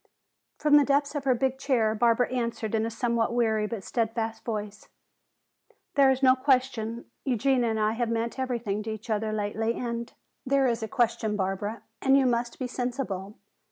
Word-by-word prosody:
From 295 Hz, -1 st, +5 dB
the 290 Hz, -, +6 dB
depth 285 Hz, +1 st, +1 dB
of 290 Hz, -2 st, -4 dB
her 260 Hz, -2 st, +4 dB
big 265 Hz, +1 st, -1 dB
chair 235 Hz, -6 st, +2 dB
Barbara 235 Hz, +2 st, +2 dB
answered 235 Hz, -3 st, -2 dB
in 220 Hz, 0 st, +1 dB
a -, -, -2 dB
somewhat 235 Hz, 0 st, 0 dB
weary 220 Hz, -3 st, +2 dB
but 215 Hz, -3 st, -5 dB
steadfast 225 Hz, 0 st, -2 dB
voice: 210 Hz, -2 st, -5 dB, 1.0 s
"There 275 Hz, -1 st, +5 dB
is 265 Hz, +1 st, +1 dB
no 255 Hz, -1 st, +7 dB
question; 255 Hz, -4 st, 0 dB, 0.2 s
Eugenia 255 Hz, -1 st, +2 dB
and 220 Hz, -1 st, -1 dB
I 215 Hz, 0 st, +2 dB
have 235 Hz, +1 st, -1 dB
meant 230 Hz, +2 st, -2 dB
everything 235 Hz, -5 st, -2 dB
to 220 Hz, -, -5 dB
each 220 Hz, +2 st, -6 dB
other 215 Hz, 0 st, 0 dB
lately, 215 Hz, +2 st, -1 dB
and 235 Hz, -1 st, -4 dB, 0.2 s
" -, -, -51 dB
"There 275 Hz, 0 st, +2 dB
is 235 Hz, -2 st, 0 dB
a 220 Hz, -, -3 dB
question, 230 Hz, -4 st, 0 dB
Barbara, 205 Hz, +3 st, -3 dB, 0.2 s
and 270 Hz, 0 st, +5 dB
you 270 Hz, -, +3 dB
must 240 Hz, -1 st, 0 dB
be 260 Hz, -, -3 dB
sensible. 245 Hz, -6 st, -4 dB
235 Hz, 185 wpm, -27 LUFS, 220-255 Hz, 1.0 s, no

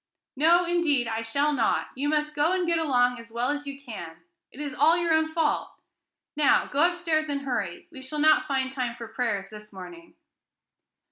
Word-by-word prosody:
"No, 335 Hz, +5 st, +4 dB
indeed, 325 Hz, -8 st, +1 dB
I 225 Hz, 0 st, -2 dB
shall 280 Hz, +6 st, 0 dB
not. 240 Hz, -5 st, 0 dB
You 285 Hz, +3 st, -2 dB
must 300 Hz, 0 st, 0 dB
go 300 Hz, +4 st, +1 dB
and 370 Hz, -1 st, 0 dB
get 335 Hz, -1 st, +1 dB
along 250 Hz, -5 st, +2 dB
as 230 Hz, 0 st, -12 dB
well 240 Hz, +4 st, -1 dB
as 290 Hz, 0 st, -4 dB
you 275 Hz, 0 st, -6 dB
can. 170 Hz, -11 st, -9 dB, 0.3 s
It 260 Hz, -, -14 dB
is 290 Hz, -2 st, -4 dB
all 320 Hz, +5 st, +4 dB
your 340 Hz, -1 st, +1 dB
own 315 Hz, 0 st, +2 dB
fault. 320 Hz, -2 st, 0 dB, 0.6 s
Now, 295 Hz, -2 st, +3 dB
go 310 Hz, +5 st, +2 dB
upstairs 325 Hz, -3 st, -1 dB
and 280 Hz, -1 st, -2 dB
hurry. 230 Hz, -10 st, -4 dB
We 270 Hz, -5 st, -10 dB
shall 265 Hz, +4 st, -6 dB
not 310 Hz, 0 st, +4 dB
find 265 Hz, -2 st, -1 dB
time 250 Hz, -3 st, -3 dB
for 235 Hz, -1 st, -8 dB
prayers 205 Hz, -6 st, -2 dB
this 210 Hz, 0 st, -12 dB
morning." 335 Hz, -, -11 dB
285 Hz, 195 wpm, -26 LUFS, 245-315 Hz, 0.6 s, No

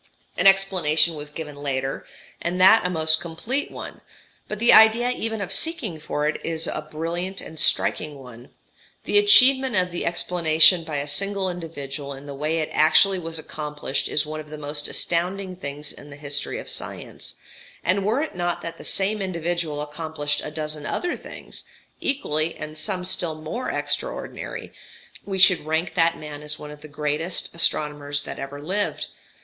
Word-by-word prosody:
An -, -, +4 dB
explanation 185 Hz, -5 st, +5 dB
was 150 Hz, -1 st, -6 dB
given 150 Hz, -1 st, -7 dB
later, 135 Hz, -1 st, -3 dB, 0.3 s
and 175 Hz, +2 st, -2 dB
that 190 Hz, +1 st, +7 dB
a -, -, -3 dB
most 160 Hz, -2 st, +3 dB
complete 175 Hz, -, -3 dB
one; -, -, -8 dB, 0.5 s
but 210 Hz, -, -4 dB
the 235 Hz, +3 st, +5 dB
idea 225 Hz, +3 st, +7 dB
even 225 Hz, -3 st, -3 dB
of 195 Hz, -, -2 dB
seeking 240 Hz, -, +1 dB
for 150 Hz, -1 st, -2 dB
it 155 Hz, -, -2 dB
is 165 Hz, 0 st, 0 dB
a 155 Hz, -2 st, -4 dB
brilliant 175 Hz, +5 st, -3 dB
and 160 Hz, -, -7 dB
striking 150 Hz, -1 st, +1 dB
one: 125 Hz, -2 st, -12 dB, 0.5 s
the 410 Hz, -, +4 dB
achievement 265 Hz, -, +6 dB
of 180 Hz, -2 st, +2 dB
the 175 Hz, -, -3 dB
explanation 170 Hz, 0 st, +4 dB
by 155 Hz, -2 st, -4 dB
a 140 Hz, +1 st, -3 dB
single 190 Hz, +5 st, 0 dB
individual 145 Hz, -5 st, -6 dB
in 135 Hz, +1 st, -11 dB
the 140 Hz, -, -7 dB
way 150 Hz, +4 st, -1 dB
it 155 Hz, -1 st, -1 dB
actually 180 Hz, +5 st, +5 dB
was 165 Hz, -1 st, -5 dB
accomplished 150 Hz, -3 st, -4 dB
is 150 Hz, -, +2 dB
one 155 Hz, +1 st, -5 dB
of 155 Hz, -1 st, -9 dB
the 155 Hz, -, -7 dB
most 145 Hz, 0 st, -3 dB
astounding 185 Hz, +2 st, -1 dB
things 145 Hz, -3 st, -6 dB
in 145 Hz, -, -13 dB
the 145 Hz, -, -10 dB
history 145 Hz, -1 st, -2 dB
of -, -, -8 dB
science; -, -, -5 dB, 0.5 s
and 190 Hz, +3 st, +2 dB
were 220 Hz, +8 st, +1 dB
it 315 Hz, -, -5 dB
not 175 Hz, -1 st, -2 dB
that 165 Hz, -, -6 dB
the -, -, -9 dB
same 200 Hz, +2 st, +1 dB
individual 170 Hz, -4 st, -2 dB
accomplished 150 Hz, -1 st, -3 dB
a -, -, -4 dB
dozen 150 Hz, -1 st, -4 dB
other 355 Hz, 0 st, -2 dB
things, -, -, -10 dB, 0.4 s
equally 160 Hz, -, 0 dB
and 155 Hz, 0 st, -7 dB
some 180 Hz, +2 st, -2 dB
still 180 Hz, -3 st, +1 dB
more 155 Hz, +11 st, -4 dB
extraordinary, -, -, -4 dB, 0.5 s
we 195 Hz, -1 st, -2 dB
should 180 Hz, -3 st, +6 dB
rank 160 Hz, +3 st, -1 dB
that 165 Hz, 0 st, +3 dB
man 150 Hz, -1 st, -8 dB
as 150 Hz, 0 st, -4 dB
one 150 Hz, 0 st, -9 dB
of 150 Hz, 0 st, -12 dB
the 155 Hz, -, -10 dB
greatest 150 Hz, +4 st, -2 dB
astronomers 145 Hz, -3 st, +1 dB
that -, -, -7 dB
ever 140 Hz, +1 st, -6 dB
lived. 190 Hz, +8 st, -2 dB
160 Hz, 175 wpm, -24 LUFS, 150-185 Hz, 0.5 s, that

